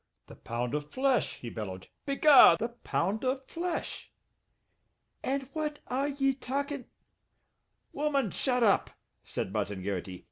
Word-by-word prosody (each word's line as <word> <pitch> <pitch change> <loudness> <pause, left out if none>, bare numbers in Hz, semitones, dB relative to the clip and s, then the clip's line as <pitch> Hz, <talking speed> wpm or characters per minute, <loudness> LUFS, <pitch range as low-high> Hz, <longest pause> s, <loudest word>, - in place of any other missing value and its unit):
"The - - -13
pound 120 +2 -4
of 150 0 -2
flesh!" 260 - +1
he 120 - -8
bellowed. 95 -4 -6 0.2
"Be 275 - 0
gar! 290 -1 +8
The 230 +2 -2
pound 215 -3 -2
of 260 +1 -1
flesh!" 340 0 -4 1.1
"And 270 0 -2
what 300 -1 -2
are 270 +3 0
ye 275 -1 +1
talkin' 280 +1 -3 0.6
" - - -48
"Woman, 280 -7 0
shut 250 -2 +1
up," 205 -3 +4 0.3
said - - -4
Martin 95 -1 -2
Garrity. 95 -2 -4
255 Hz, 140 wpm, -30 LUFS, -, 1.1 s, gar